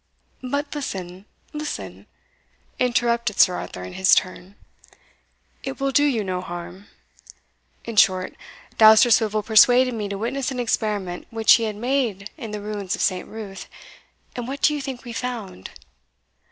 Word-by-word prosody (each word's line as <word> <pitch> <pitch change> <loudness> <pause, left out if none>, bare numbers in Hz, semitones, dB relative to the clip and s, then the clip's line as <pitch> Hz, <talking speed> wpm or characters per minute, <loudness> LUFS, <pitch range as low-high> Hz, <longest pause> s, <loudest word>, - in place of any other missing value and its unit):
"But 285 +3 -3
listen 190 -9 -6 0.3
listen," 300 0 -6 0.7
interrupted 235 -3 0
Sir 180 - +6
Arthur 90 - -6
in 90 - -8
his 190 0 +4
turn, 185 +1 -3 1.1
"it 270 0 -6
will 275 0 0
do 290 - +3
you 255 -7 +1
no 185 -2 -3
harm. 175 +2 -8 1.0
In 230 -2 -6
short, 185 -3 +3 0.5
Dousterswivel 220 -1 +6
persuaded 245 +4 +5
me 210 -3 -4
to 200 - -4
witness 250 +5 -2
an 260 -2 -5
experiment 210 -6 -2
which 225 -1 +5
he 230 - +3
had 215 -1 -3
made 230 -4 -2
in 235 -8 -8
the 210 0 -5
ruins 205 -2 -4
of - - -6
St. 185 -2 0
Ruth 195 -3 -8 0.7
and 245 -1 -5
what 275 +2 -6
do 300 - +5
you 295 - -3
think 265 -3 -7
we 240 - -7
found?" 230 - -6
220 Hz, 150 wpm, -23 LUFS, 195-250 Hz, 1.1 s, Sir